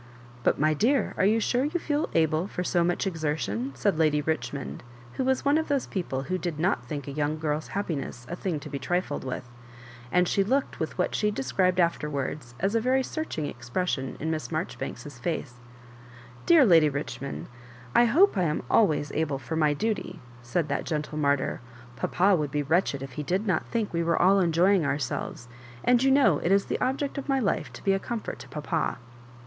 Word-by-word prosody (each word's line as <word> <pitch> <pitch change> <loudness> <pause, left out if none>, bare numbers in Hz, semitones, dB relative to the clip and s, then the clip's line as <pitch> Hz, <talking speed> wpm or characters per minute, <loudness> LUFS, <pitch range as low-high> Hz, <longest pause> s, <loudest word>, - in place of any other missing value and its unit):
" 120 0 -21
But, - - +3
my 155 +1 +3
dear, 245 - +2
are - - +2
you 220 +2 +3
sure 245 +3 +1
you 315 +5 -1
feel 300 -1 -1
able 160 +2 +2
for 180 - -4
so 175 -1 +2
much 175 +3 0
exertion 150 - -2
?" - - -19
said 120 +6 +1
Lady 155 -2 +3
Richmond, 145 -2 -3 0.3
w4io 260 - -1
was 265 +1 +1
one 285 +2 +4
of 320 - -3
those 280 -3 0
people 150 -9 -3
who 185 +5 -2
did 175 -5 -3
not 165 -6 +1
think 145 0 -5
a - - -4
young 150 +2 -1
girl's 155 0 -2
happiness 145 -10 -3
a 175 - -4
thing 175 -4 -2
to - - -8
be 140 - -3
trifled 175 +6 -1
with; 130 -2 -5 0.6
and 180 0 +3
she 195 - +2
looked 265 +7 0
with - - -3
what - - 0
she 210 - +1
described 180 +2 +1
afterwards 145 -6 -1
as 195 +3 0
a 230 - +2
very 260 +2 +2
searching 285 - -3
expression 130 +2 -3
in 160 +2 -2
Miss 155 0 -3
Marjoribanks*s 150 -4 -5
face. 150 -2 -3 0.5
'* 120 0 -19
Dear 330 -5 +7
Lady 165 -7 +6
Richmond, 140 -1 -5 0.5
I 240 - +6
hope 320 - +5
I 185 -3 +2
am 150 -1 -1
always 155 -9 +3
able 155 -3 -1
for 135 +4 -5
my 150 -2 +2
duty," 220 +6 -2 0.2
said 130 +7 -1
that 140 - -1
gentle 155 -1 -3
martyr, 140 -2 +1 0.2
" 120 0 -19
Papa 185 - +2
would 150 -4 -1
be 145 +1 -1
wretched 145 -3 +1
if 135 - -7
he 150 - -5
did 185 +8 -1
not 185 -6 0
think 225 -5 -2
we 170 - +1
were 165 0 +1
all 195 +3 +5
enjoying 180 +1 +3
ourselves; 140 -4 -3 0.4
and 245 -1 +4
you 270 - +4
know 265 - +5
it 170 - 0
is 200 0 +4
the - - -3
object 275 +2 -1
of 280 - -8
my 270 - +3
life 225 -7 0
to - - -11
be 195 - +3
a 195 - +1
comfort 230 +1 -5
to - - -10
papa." 155 +2 -2
160 Hz, 210 wpm, -27 LUFS, 145-200 Hz, 0.6 s, Dear